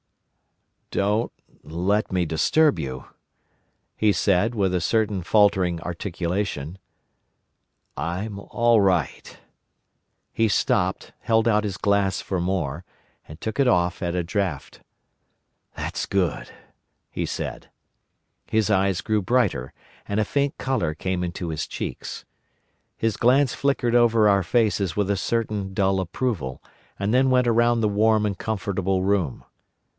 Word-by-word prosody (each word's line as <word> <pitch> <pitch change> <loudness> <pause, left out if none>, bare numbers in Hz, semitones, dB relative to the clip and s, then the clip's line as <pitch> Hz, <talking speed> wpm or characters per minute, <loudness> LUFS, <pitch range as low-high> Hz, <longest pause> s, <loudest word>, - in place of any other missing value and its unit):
"Don't 105 +3 0 0.3
let 95 +6 -1
me 90 -2 +1
disturb 140 - +2
you," 65 -1 -5 0.9
he 105 -1 +3
said, 100 +3 +2
with 95 -3 +1
a 90 - +1
certain 105 +1 +1
faltering 95 -3 +3
articulation. 90 -1 -3 1.2
"I'm 95 +8 -4
all 120 +2 +2
right." 90 -7 0 1.0
He 115 -1 +2
stopped, - - 0
held 115 0 +2
out 105 -2 +3
his 100 -4 -3
glass 100 -1 +1
for 95 -3 -3
more, 85 -4 -2 0.4
and 75 +1 -11
took 110 - -4
it 135 - +4
off 90 -4 +1
at 85 -1 -2
a 90 - 0
draught. 90 -5 -3 1.0
"That's - - -3
good," 95 -5 -1 0.6
he - - -2
said. - - -5 0.8
His 110 -1 +1
eyes 95 -3 +2
grew 110 -1 0
brighter, 100 - 0 0.4
and 100 +1 -1
a 110 - +2
faint 140 +4 -1
colour 120 -12 -1
came 90 +2 -2
into 85 0 -4
his 80 -1 -3
cheeks. - - -6 0.7
His 115 -2 -1
glance 130 +2 +3
flickered 125 -4 0
over 115 -2 +5
our 100 -1 +3
faces 105 -4 +1
with 100 -1 +1
a - - +2
certain 105 -2 -2
dull 95 -1 +2
approval, 85 - -3 0.4
and 100 +3 0
then 130 +1 +4
went 125 -1 +3
round 120 0 +3
the - - +4
warm 105 +1 +2
and 100 -2 -2
comfortable 95 -3 -1
room. 95 -9 0
100 Hz, 130 wpm, -24 LUFS, 90-110 Hz, 1.2 s, over